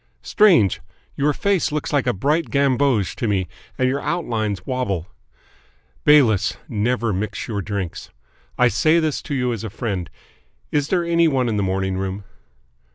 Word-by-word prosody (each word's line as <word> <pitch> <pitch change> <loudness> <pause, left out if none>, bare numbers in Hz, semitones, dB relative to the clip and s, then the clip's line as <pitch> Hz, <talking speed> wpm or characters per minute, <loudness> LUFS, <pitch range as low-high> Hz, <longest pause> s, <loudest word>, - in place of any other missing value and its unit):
"Strange! 170 - +4 0.3
Your 145 +2 +2
face 190 +1 0
looks 150 0 -3
a 145 - +4
bright 150 - 0
gamboge 135 -6 +1
to 115 - -1
me, 95 -3 0 0.3
and 130 - +2
your 135 +2 0
outlines 115 - -2
wobble. 125 - -2 1.0
Bayliss, 120 -10 +4
never 115 0 0
mix 105 +3 -3
your 105 -4 -3
drinks. 100 -3 -5 0.5
I 125 - +5
say 155 +7 +3
this 155 -3 -1
to 145 - -4
you 125 -2 0
as 115 - -6
a 110 - -4
friend. 100 -4 -4 0.6
Is 145 -1 +1
there 175 +1 +1
any 170 0 +3
one 130 -5 +1
in 110 -2 -1
the - - +1
morning 95 0 -1
room?" 95 +1 -4
125 Hz, 160 wpm, -21 LUFS, 100-145 Hz, 1.0 s, I